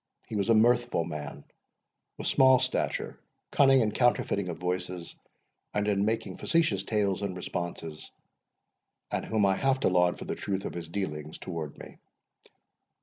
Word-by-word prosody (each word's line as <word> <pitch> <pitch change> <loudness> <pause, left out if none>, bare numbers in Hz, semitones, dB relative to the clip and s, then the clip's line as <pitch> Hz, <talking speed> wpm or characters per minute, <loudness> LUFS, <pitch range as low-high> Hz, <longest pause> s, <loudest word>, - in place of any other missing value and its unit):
He 110 - -6
was 100 +2 0
a 115 - +6
mirthful 120 -3 +3
man, 75 -3 -7 0.7
of - - -6
small 130 -1 +6
stature, - - -2 0.3
cunning 135 -2 +5
in 110 -2 +1
counterfeiting 100 -6 +1
of 85 - -4
voices, 90 -1 -4 0.6
and 105 0 +1
in 100 -1 +2
making 110 +1 -2
facetious 155 - +1
tales 100 -2 0
and 100 -2 -3
responses, 85 -3 -5 1.0
and - - -1
whom 110 -2 +1
I 95 - +4
have 135 -1 +2
to - - +3
laud 90 -1 +3
for - - -7
the - - -2
truth 95 -1 -3
of - - -4
his 85 -2 -6
dealings 75 -5 -4
towards 80 -5 -6
me. - - -11
100 Hz, 155 wpm, -29 LUFS, 85-115 Hz, 1.0 s, a